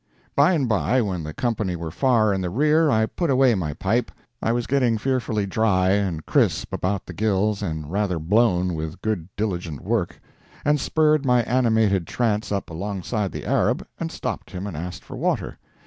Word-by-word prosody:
By 185 - +5
and 145 -7 +1
by, 110 - +2
when 90 -5 -3
the 75 - -5
company 110 -2 -1
were 85 -1 -5
far 110 - +3
in 95 - -1
the 90 - -2
rear, 150 - +3
I 110 -4 +3
put 170 +8 -2
away 130 -2 +4
my 80 -8 -2
pipe 100 +9 0 0.3
I 115 - +1
was 120 0 0
getting 125 -4 +2
fearfully 115 -4 -1
dry 95 -2 +2
and 95 -6 0
crisp - - +1
about 95 +1 -1
the 90 - -8
gills 105 +1 0
and 80 -5 -4
rather 100 -2 0
blown 90 +1 +2
with 80 0 -5
good 100 -6 -2
diligent 90 - -3
work - - -1 0.5
and 150 0 +3
spurred 155 +1 +2
my 125 -3 +3
animated 110 -7 +2
trance 110 -3 -1
up 100 -4 -2
alongside 100 +3 -3
the - - -6
Arab - - +1
and - - -3
stopped - - -5
him 95 +1 -6
and 100 -5 -5
asked 90 +2 -6
for - - -9
water. - - -1
105 Hz, 185 wpm, -23 LUFS, 90-120 Hz, 0.5 s, By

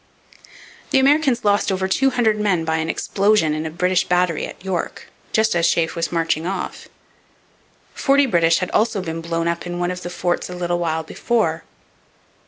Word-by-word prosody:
The - - +3
Americans 270 -3 +3
lost 205 0 +2
over 190 0 -1
two 270 +8 +2
hundred 225 -4 +1
men 185 -6 +1
by 160 0 0
an 160 0 -2
explosion 200 -6 +1
in 155 +1 -3
a - - -4
British 180 +3 +1
battery 180 -2 0
at - - -13
York 185 -3 -4 0.2
just 220 -1 +2
as 170 -1 +3
Sheaffe 165 -1 +1
was 165 -1 -2
marching 165 -1 0
off. 190 -1 -5 1.0
Forty 280 0 +3
British 170 -8 +3
had 185 - -3
also 215 -2 +1
been 165 -1 -4
blown 165 0 -2
up 170 +1 -2
in 175 0 -4
one 175 0 -1
of 180 0 -6
the 175 - -5
forts 175 0 -2
a 180 - -6
little 175 0 -1
while 160 -1 -1
before. 165 -3 -1
180 Hz, 185 wpm, -20 LUFS, 165-210 Hz, 1.0 s, The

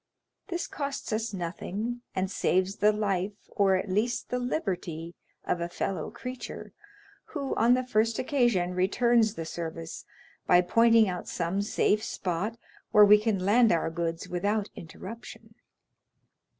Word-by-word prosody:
This 350 -3 -3
costs 280 -5 -4
us 220 +1 -1
nothing, 200 +6 -4
and 190 0 -1
saves 190 0 +1
the 210 +1 +4
life, 205 -2 -1 0.2
or 200 -4 +3
at 185 - -1
least 215 +6 -1
the 250 - 0
liberty, 175 - -3 0.3
of 170 - -1
a 170 - -2
fellow 185 +2 -3
creature, 250 +2 -7 0.5
who 280 -3 -4
on 235 +3 +4
the 255 0 -1
first 225 -2 +1
occasion 240 -10 +1
returns 220 +4 +2
the 165 - -5
service 165 0 -6 0.4
by 180 0 +6
pointing 230 +4 +5
out 180 -1 -4
some 175 +3 -1
safe 210 0 +1
spot 190 +5 -3 0.3
where 210 0 +7
we 210 +1 +7
can 210 -4 -1
land 230 +3 +5
our 165 -1 +1
goods 165 0 -3
without 200 +4 -1
interruption." 190 +7 -10
205 Hz, 140 wpm, -28 LUFS, 180-230 Hz, 0.5 s, where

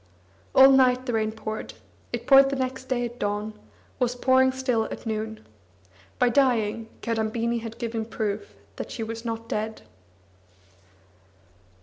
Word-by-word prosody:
All 270 +1 +9
night 255 -1 +4
the 245 - -2
rain 220 -1 +1
poured; 220 0 -6 0.4
it - - -4
poured 275 0 +6
next 260 0 -3
day 250 -2 -1
at 240 +1 -8
dawn, 205 +1 -2 0.5
was 245 -1 +1
pouring 260 +1 +4
still 255 -4 0
at - - -7
noon. 220 0 -4 0.7
By 245 - +4
dying, 230 -4 +1
Kadambini 230 +1 -1
had 225 0 -8
given 230 -2 -3
proof 215 -2 -4 0.2
that - - -5
she 230 - -4
was 225 +1 -6
not 230 -1 -4
dead. 220 0 -3
230 Hz, 135 wpm, -26 LUFS, 220-255 Hz, 0.7 s, All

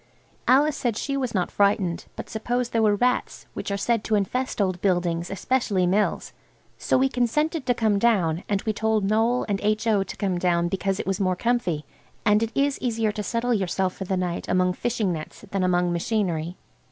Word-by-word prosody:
Alice 290 +3 +4
said 235 -4 -1
she 275 - -2
was 255 -5 -2
not 180 -2 0
frightened, 200 -4 +1
but - - -7
suppose 240 +2 -2
there 230 - +1
were 210 -2 +4
rats, 250 +4 0
which - - -5
are 200 - -1
said 230 +1 0
to 220 - +1
infest 250 +6 -1
old 185 -3 0
buildings, 175 -3 0
especially 195 -1 0
mills? 200 +4 0 0.5
So - - +2
we 265 +1 +3
consented 270 +5 0
to 245 - +3
come 215 -3 +2
down, 185 -7 +2
and 200 -1 0
we 215 - 0
told 220 -2 +1
Noël 225 +4 +2
and 200 -2 -1
H.O. 215 0 +2
to 195 - -6
come 190 -4 -1
down 175 -1 +1
because 195 +1 -1
it - - -3
was 195 +1 -1
more 185 -2 +1
comfy, 185 -9 -1 0.4
and 210 0 +4
it 225 0 -1
is 280 0 +1
easier 225 -3 0
to 210 - -4
settle 235 +3 0
yourself 190 -2 0
for 190 - -5
the 190 0 -1
night 180 -1 -2
among 180 0 +2
fishing 220 -3 -1
nets 155 +5 -8
than 195 -1 0
among 180 -1 +2
machinery. 175 -3 -1
205 Hz, 200 wpm, -24 LUFS, 185-235 Hz, 0.5 s, Alice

